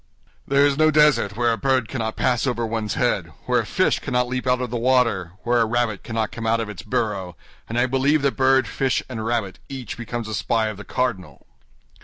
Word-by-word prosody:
"There 140 +1 +4
is 145 0 +1
no 155 0 +5
desert 145 -10 +3
where 120 -1 +2
a 115 - -2
bird 130 -4 +1
cannot 110 -4 -3
pass 125 +1 +1
over 120 -2 -1
one's 110 -2 -2
head, - - 0
where - - +2
a - - -3
fish - - +1
cannot 125 -1 0
leap 130 +1 -3
out 125 0 +3
of 125 -2 -3
the - - -3
water, 115 -8 +1
where 120 0 +2
a - - +4
rabbit 115 -2 -1
cannot 115 -2 -2
come 115 -1 -5
out 115 +1 +2
of 115 -2 -3
its 105 - -7
burrow, 105 -8 -2 0.3
and 115 - -3
I 120 - +4
believe 135 +3 +2
that 140 - +1
bird, 130 -2 +3
fish, 130 +6 0
and 115 -4 -5
rabbit 110 -4 -2
each 135 -2 -6
becomes 120 -1 -5
a 110 - -5
spy 110 +4 0
of 105 - -7
the 100 - -8
cardinal. 125 -8 -3
120 Hz, 225 wpm, -22 LUFS, 110-130 Hz, 0.3 s, no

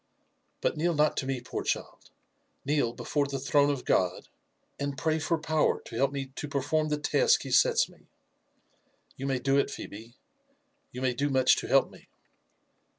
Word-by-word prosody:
"But - - 0
kneel 170 +2 +1
not 150 0 +3
to 135 - -2
me, 135 -2 -2
poor 125 - -5
child; - - -4 0.6
kneel 145 -4 +1
before 145 +4 -1
the 140 0 -3
throne 145 +2 +2
of 140 -3 -2
God, 90 -1 0 0.5
and 140 -1 -3
pray 160 +1 0
for 165 +1 0
power 155 -1 +1
to - - -10
help 135 +3 +2
me 135 -1 -5
to 150 - -4
perform 145 +2 0
the 150 - 0
task 455 - +2
he - - -7
sets 475 -1 +4
me. - - -21 1.1
You 135 - -5
may 135 -1 +1
do 135 +2 +2
it, - - +1
Phebe, 115 +4 -9 0.4
— 285 0 -45
^you 125 - -4
may 130 -1 +2
do 140 +4 -1
much 130 -2 +4
to - - -4
help - - +3
me." - - -17
140 Hz, 185 wpm, -28 LUFS, 130-155 Hz, 1.1 s, sets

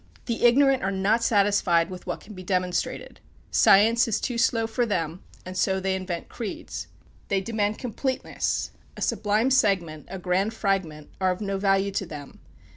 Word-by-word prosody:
The 235 0 0
ignorant 270 +2 +5
are 195 - 0
not 200 +4 +1
satisfied 200 -6 +3
with 185 0 -9
what 175 - -3
can 210 - -12
be 185 - -9
demonstrated. 180 -1 -2 0.3
Science 225 +5 +5
is 225 - 0
too 245 - -3
slow 230 -1 +2
for 225 +2 -1
them, 175 -6 -2 0.2
and 185 0 -7
so 190 +1 +1
they 190 0 -1
invent 185 -2 -4
creeds. 220 -5 -6 0.4
They 195 - +1
demand 210 +1 -1
completeness. 260 +1 -2 0.3
A - - -8
sublime 215 +5 +1
segment, 185 - +1
a 190 - -5
grand 190 +4 0
fragment, 185 -8 -2
are 185 - +3
of 180 - -1
no 200 -2 -2
value 195 0 +2
to 190 -1 -3
them. 145 -3 -9
195 Hz, 170 wpm, -25 LUFS, 185-225 Hz, 0.4 s, ignorant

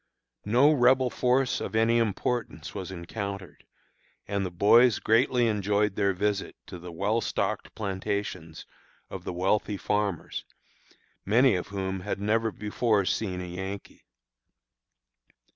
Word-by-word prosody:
No 125 +8 +5
Rebel 130 -1 +4
force 125 +1 +1
of - - -4
any 115 +1 +3
importance 115 +2 -2
was 95 - -5
encountered, 100 +1 -6 0.6
and 100 -1 -1
the 95 - -2
boys 110 +7 +5
greatly 120 +2 +3
enjoyed 105 -1 +1
their 100 -1 +2
visit 100 +1 -2
to 90 - -9
the 90 +1 -9
well 105 +7 0
stocked 100 0 -2
plantations 95 -5 -4 0.5
of - - -7
the - - -3
wealthy 100 +3 0
farmers, 105 -4 -2 0.8
many 120 +4 +4
of 90 - -2
whom 95 -1 -3
had 100 +2 -4
never 110 +2 +1
before 105 0 0
seen 90 -2 -1
a - - -5
Yankee. 95 +3 -7
105 Hz, 125 wpm, -27 LUFS, 95-115 Hz, 0.8 s, No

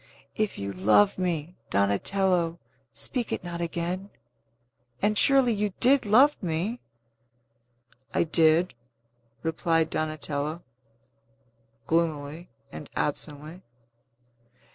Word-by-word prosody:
If 215 -1 -1
you 100 0 -4
love 105 - +3
me, 175 -2 -2
Donatello, 170 - +1 0.3
speak 250 -4 -1
it - - -3
not 170 -1 -5
again. 175 +3 -3 0.9
And 210 +1 +1
surely 265 0 +5
you 205 -2 -1
did 260 -2 +4
love 265 +8 +5
me?" 180 +7 -2 1.3
"I - - +2
did," 165 +2 +3 0.7
replied 165 0 +1
Donatello 155 +1 -3 1.2
gloomily 160 +1 -1 0.2
and 150 - -9
absently. 150 +3 -4
170 Hz, 90 wpm, -27 LUFS, 155-195 Hz, 1.3 s, surely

